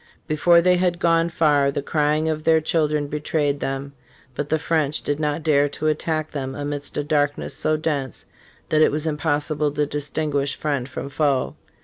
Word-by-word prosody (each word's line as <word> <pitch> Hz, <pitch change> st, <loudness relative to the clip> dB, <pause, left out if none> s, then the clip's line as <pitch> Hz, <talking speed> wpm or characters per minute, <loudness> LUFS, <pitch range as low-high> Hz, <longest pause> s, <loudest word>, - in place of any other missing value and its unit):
Before 170 Hz, +2 st, +4 dB
they 180 Hz, 0 st, +4 dB
had 175 Hz, -1 st, +1 dB
gone 165 Hz, 0 st, +2 dB
far 150 Hz, -4 st, +3 dB
the 140 Hz, 0 st, -3 dB
crying 150 Hz, +1 st, +1 dB
of 155 Hz, -1 st, -2 dB
their 160 Hz, 0 st, +4 dB
children 150 Hz, -2 st, 0 dB
betrayed 145 Hz, -1 st, -1 dB
them 135 Hz, +1 st, -4 dB, 0.4 s
But 145 Hz, +3 st, -4 dB
the 160 Hz, -, +2 dB
French 155 Hz, -2 st, 0 dB
did 145 Hz, +1 st, -1 dB
not 150 Hz, +1 st, -1 dB
dare 145 Hz, -2 st, +3 dB
to 150 Hz, -, -6 dB
attack 155 Hz, 0 st, -1 dB
them 135 Hz, -2 st, -4 dB
amidst 145 Hz, 0 st, -4 dB
a 145 Hz, -, 0 dB
darkness 145 Hz, -1 st, 0 dB
so 155 Hz, 0 st, +1 dB
dense 145 Hz, -5 st, -3 dB, 0.4 s
that 155 Hz, -, +3 dB
it -, -, +5 dB
was 150 Hz, +2 st, -2 dB
impossi 150 Hz, -1 st, -1 dB
ble 150 Hz, 0 st, +1 dB
to 150 Hz, 0 st, +1 dB
distinguish 145 Hz, -1 st, -2 dB
friend 140 Hz, -4 st, -2 dB
from 140 Hz, -, -6 dB
foe. 140 Hz, -2 st, 0 dB
150 Hz, 185 wpm, -22 LUFS, 145-155 Hz, 0.4 s, it